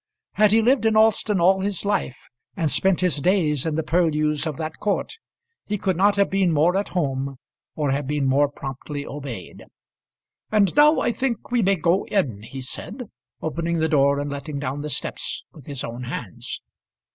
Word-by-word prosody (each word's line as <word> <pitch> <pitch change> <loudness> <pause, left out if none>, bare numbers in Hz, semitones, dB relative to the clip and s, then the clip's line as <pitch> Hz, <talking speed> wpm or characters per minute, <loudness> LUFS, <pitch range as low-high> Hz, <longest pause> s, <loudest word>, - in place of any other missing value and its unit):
Had 210 -1 +4
he 225 +1 +4
lived 245 -1 +3
in 220 -1 +3
Alston 220 -2 +3
all 190 +3 +4
his 200 -1 -3
life, 200 -10 0 0.4
and 160 -5 +1
spent 185 +7 +2
his 180 -5 +2
days 155 -3 +1
in 155 - -1
the 160 - 0
purlieus 155 -2 +1
of 150 -4 -4
that 155 0 -5
court, 205 - -1 0.5
he 210 - -1
could 190 -1 0
not 200 +4 +4
have 200 -1 +3
been 190 -2 +2
more 160 +4 +3
at 200 +1 0
home 135 -3 -1 0.4
or 150 -3 0
have 140 0 -1
been 145 -1 0
more 140 +2 +3
promptly 140 +1 -6
obeyed. 135 -10 -7 0.9
"And 210 -3 +3
now 300 +2 +6
I 240 - +1
think 240 -2 -3
we 245 -1 +3
may 195 -1 +3
go 180 +1 +1
in," 130 - 0
he 130 +5 -8
said, 220 - -8 0.3
opening 165 +2 -1
the 160 0 +2
door 140 -2 +3
and 145 0 -3
letting 140 +1 -5
down 140 +1 -3
the 150 - -4
steps - - -3
with 150 -5 -15
his 140 -3 -3
own 120 +2 -5
hands. 115 -5 -6
160 Hz, 190 wpm, -23 LUFS, 140-195 Hz, 0.9 s, now